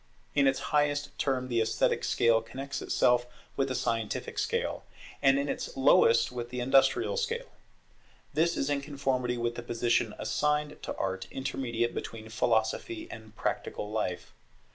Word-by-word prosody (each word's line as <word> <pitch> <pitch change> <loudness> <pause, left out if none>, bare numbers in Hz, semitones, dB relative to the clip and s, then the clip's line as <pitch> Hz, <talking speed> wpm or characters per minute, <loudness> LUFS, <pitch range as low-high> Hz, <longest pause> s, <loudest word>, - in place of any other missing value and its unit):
In 140 -1 +4
its 135 - +2
highest 145 -1 +1
term 130 -2 0
the 120 -2 +1
esthetic 110 0 +1
scale 115 -1 +3
connects 135 +5 -6
itself 125 0 +2 0.3
with 135 - +1
the 130 - -2
scientific 115 -3 -2
scale; - - -1 0.4
and 135 0 +5
in 140 +1 0
its - - -4
lowest 115 -4 +5
with 120 -1 -5
the 125 0 -4
industrial 135 - +3
scale. 475 +1 -2 0.8
This 165 +3 +2
is 135 - 0
in 145 -1 0
conformity 135 -4 -1
with 120 0 -1
the 120 - -6
position 120 -1 0
assigned 150 0 0
to - - -4
Art 95 0 -3
intermediate 125 -3 -2
between 110 -1 -6
Philosophy 115 - 0
and 110 -1 -11
Practical 105 -1 -3
life. 90 -5 -3
125 Hz, 150 wpm, -29 LUFS, 115-140 Hz, 0.8 s, and